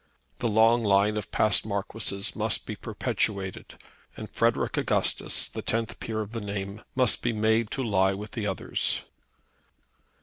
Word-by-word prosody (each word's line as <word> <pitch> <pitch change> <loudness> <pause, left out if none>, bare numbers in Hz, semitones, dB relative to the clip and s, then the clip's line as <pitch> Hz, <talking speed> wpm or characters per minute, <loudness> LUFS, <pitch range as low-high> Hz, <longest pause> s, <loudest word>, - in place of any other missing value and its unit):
The 120 - 0
long 115 +2 +4
line 100 +1 +3
of 105 - -4
past 110 -1 +3
Marquises 100 -1 -2
must - - 0
be - - -5
perpetuated, 95 -2 -3 0.4
and - - -8
Frederic - - +1
Augustus, - - +1
the - - -6
tenth 115 -1 -1
peer 110 -1 -3
of 105 0 -6
the 115 -1 -4
name, 100 0 -5
must 130 -2 +3
be 120 - 0
made 110 +1 +2
to 135 - -2
lie 95 -4 +2
with 105 +2 -7
the 110 -3 -3
others. 95 - 0
105 Hz, 155 wpm, -27 LUFS, 100-115 Hz, 0.4 s, long